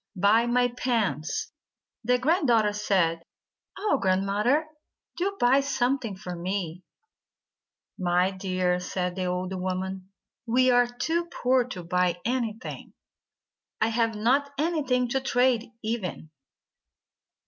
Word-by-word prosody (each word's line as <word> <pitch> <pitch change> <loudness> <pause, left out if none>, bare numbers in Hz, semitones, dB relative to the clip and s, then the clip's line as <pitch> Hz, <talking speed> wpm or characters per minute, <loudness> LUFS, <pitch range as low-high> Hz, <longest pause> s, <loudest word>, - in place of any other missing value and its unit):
Buy 210 +5 +4
my 245 +1 +3
pans!" 230 - -1 0.5
The 250 +2 +3
grand 310 +5 +1
daughter 220 -3 +3
said: 185 -5 +1 0.6
"Oh, 400 -8 +1
Grandmother, 200 +10 +2 0.5
do 390 +3 -2
buy 250 +3 +5
some 270 -1 +1
thing 225 -6 -5
for 185 -2 -7
me 180 -1 -3 0.6
!" - - -40
"My 180 +1 +2
dear," 185 -2 -1
said 180 0 -3
the 185 -1 -2
old 180 +1 -2
woman, 185 0 -4 0.4
"we 255 +2 +4
are 245 0 +4
too 325 +8 -2
poor 250 0 +4
to 190 -8 -7
buy 180 0 +1
anything. 235 -2 -3 0.9
I 220 - +2
have 225 -1 +1
not 260 +7 +2
anything 285 -6 +1
to 265 +1 0
trade, 245 -3 +2
even." 210 -8 -4
225 Hz, 125 wpm, -26 LUFS, 185-250 Hz, 0.9 s, buy